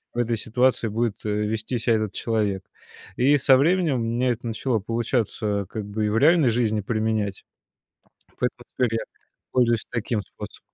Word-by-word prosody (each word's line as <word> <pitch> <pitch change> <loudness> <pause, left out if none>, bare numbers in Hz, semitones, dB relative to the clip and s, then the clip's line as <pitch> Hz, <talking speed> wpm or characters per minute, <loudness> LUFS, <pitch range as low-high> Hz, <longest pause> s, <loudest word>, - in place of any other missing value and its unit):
в - - -7
этой 120 -1 +1
ситуации 125 +2 +1
будет, 110 0 -2
э, 110 - -2
вести 105 +3 -1
ся 115 +1 0
этот 110 -3 +1
человек. 105 -4 -1 0.5
И 140 +4 +4
со 135 -1 +5
временем 165 +1 +2
у - - -1
меня 120 +2 0
это 120 0 -4
начало 115 +1 -1
получаться 110 -2 -1
как 110 -2 -5
бы 105 +1 -2
и - - +1
в 105 - +1
реальной 155 +1 +5
жизни 110 -2 +1
применять. 110 -1 -1 0.9
Поэтому 125 0 -2
теперь 125 -3 +1
я - - -5 0.5
пользуюсь 120 -3 +2
таким 115 -2 -1
способом. 95 - -10
115 Hz, 170 wpm, -24 LUFS, 105-125 Hz, 0.9 s, со